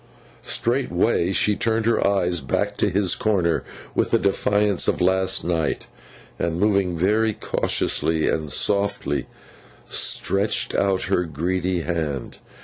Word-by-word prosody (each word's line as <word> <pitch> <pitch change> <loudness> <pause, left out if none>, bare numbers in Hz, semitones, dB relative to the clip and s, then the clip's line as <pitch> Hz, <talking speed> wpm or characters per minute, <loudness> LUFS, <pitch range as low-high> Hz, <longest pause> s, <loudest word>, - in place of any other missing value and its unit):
Straightway 115 -6 0
she 105 +2 +2
turned 110 0 0
her 115 -3 +2
eyes 90 -4 +1
back 100 +10 -1
to - - +2
his 95 -1 +2
corner, 95 -6 0 0.3
with - - 0
the - - +3
defiance 100 0 +1
of - - +1
last 95 +1 +2
night, 80 -4 -1 0.5
and 85 0 -1
moving 100 -4 +1
very 105 +5 +2
cautiously 80 -4 0
and 75 -2 -1
softly, 100 0 0 0.6
stretched 100 +2 0
out 95 -1 +1
her 90 - 0
greedy 90 +3 -2
hand. 80 -6 -4
95 Hz, 125 wpm, -22 LUFS, 85-105 Hz, 0.6 s, the